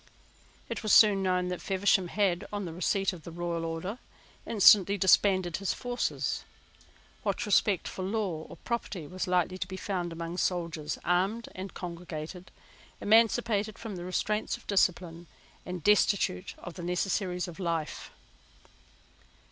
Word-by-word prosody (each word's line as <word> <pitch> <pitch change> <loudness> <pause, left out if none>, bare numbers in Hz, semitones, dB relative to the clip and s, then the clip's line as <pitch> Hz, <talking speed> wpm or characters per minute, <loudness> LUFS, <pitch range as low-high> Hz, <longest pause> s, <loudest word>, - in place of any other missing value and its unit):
It - - -4
was 215 - +1
soon 205 -3 +7
known 180 -1 +1
that 180 - -4
Feversham 190 -1 +2
had, 185 -2 0
on 205 -2 -3
the 165 - -6
receipt 195 +2 0
of 175 - -10
the 170 - -9
royal 170 0 -3
order, 165 +8 -4 0.5
instantly 200 -2 +6
disbanded 185 -2 +3
his 195 -1 -2
forces. 245 0 -2 0.8
What 240 - -1
respect 205 -2 +2
for - - -6
law 190 -5 -2
or - - -10
property 230 -8 -4
was 185 +4 -4
likely 180 0 +1
to - - -3
be 190 - -6
found 180 -3 -3
among 165 +1 -5
soldiers, 170 -4 -2
armed 190 +6 0
and 190 +1 -7
congregated, 175 0 -7 0.5
emancipated 220 -1 +3
from 225 -4 -6
the 175 - -6
restraints 210 +4 -1
of - - -20
discipline, 175 -3 0 0.4
and 180 -3 -5
destitute 200 - +2
of 175 - -9
the 175 - -8
necessaries 180 +1 -1
of 175 +1 -10
life? 165 -4 -3
185 Hz, 145 wpm, -29 LUFS, 175-200 Hz, 0.8 s, soon